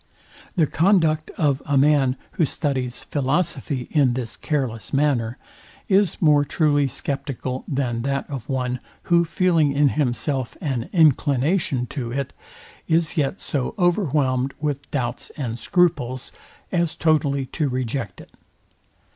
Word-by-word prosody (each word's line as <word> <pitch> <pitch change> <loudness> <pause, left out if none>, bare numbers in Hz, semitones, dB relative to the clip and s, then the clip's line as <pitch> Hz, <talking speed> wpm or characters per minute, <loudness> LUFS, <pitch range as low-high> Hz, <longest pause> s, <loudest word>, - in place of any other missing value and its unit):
The 165 -5 +4
conduct 160 -2 +2
of 145 -4 +1
a 145 -2 +1
man, 135 -2 +4 0.2
who 170 - 0
studies 130 -5 -2
philosophy 140 -2 -1
in 140 -6 +3
this 120 -2 -4
careless 130 - -3
manner, 135 -4 +1 0.5
is 195 -3 +2
more 150 -3 +5
truly 145 -1 +2
sceptical 135 -1 -4
than 125 -4 -1
that 140 +2 -2
of 135 -3 -7
one, 125 -2 -1 0.3
who 170 0 +6
feeling 165 -4 +2
in 145 0 +4
himself 130 -1 -1
an 130 -6 -2
inclination 145 -3 +2
to 125 -2 -5
it, 135 +1 -3 0.5
is 165 -1 +2
yet 150 +4 0
so 135 -5 -2
overwhelmed 145 -8 +1
with 145 -2 -3
doubts 125 -4 -3
and 120 -5 -3
scruples, 130 -5 +1 0.4
as 170 -3 0
totally 145 -4 +1
to 145 +3 -2
reject 125 -4 -3
it. - - -14
140 Hz, 130 wpm, -23 LUFS, 130-155 Hz, 0.5 s, who